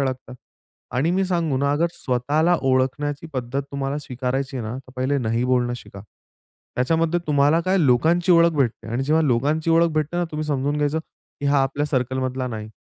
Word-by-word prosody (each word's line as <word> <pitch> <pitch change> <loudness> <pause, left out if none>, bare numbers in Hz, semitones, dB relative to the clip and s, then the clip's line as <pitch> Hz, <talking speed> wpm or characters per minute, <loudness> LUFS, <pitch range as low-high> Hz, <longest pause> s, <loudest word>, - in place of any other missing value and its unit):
अडकतात. 130 -1 -3 0.6
आणि 140 +7 +1
मी 190 +1 +1
सांगू 170 -6 0
ना, 140 +1 +1
अगर 165 +4 +2
स्वतःला 150 +8 +1
ओळखण्याची 135 +3 0
पद्धत 130 +1 -3
तुम्हाला 140 +1 -2
स्वीकारायची 130 0 -3
आहे 115 -3 -4
ना, 115 - -4
तर 130 -1 -14
पहिले 135 +2 0
नाही 115 0 0
बोलणं 125 -1 +1
शिका. 100 -4 -11 0.8
त्याच्यामध्ये 165 +6 +1
तुम्हाला 145 +2 +3
काय 190 +1 +2
लोकांची 165 +6 +3
ओळख 170 0 +6
भेटते 120 -6 0
आणि 125 +3 0
जेव्हा 155 +3 +3
लोकांची 145 +6 +1
ओळख 165 +1 +4
भेटते 155 +2 -1
ना, 175 - +1
तुम्ही 155 0 -3
समजून 145 0 -1
घ्यायचं 150 +1 0 0.4
की 145 - -1
हा 140 -1 +3
आपल्या 140 +2 -1
सर्कलमधला 130 -1 -1
नाही. 110 -2 -6
140 Hz, 180 wpm, -22 LUFS, 130-155 Hz, 0.8 s, ओळख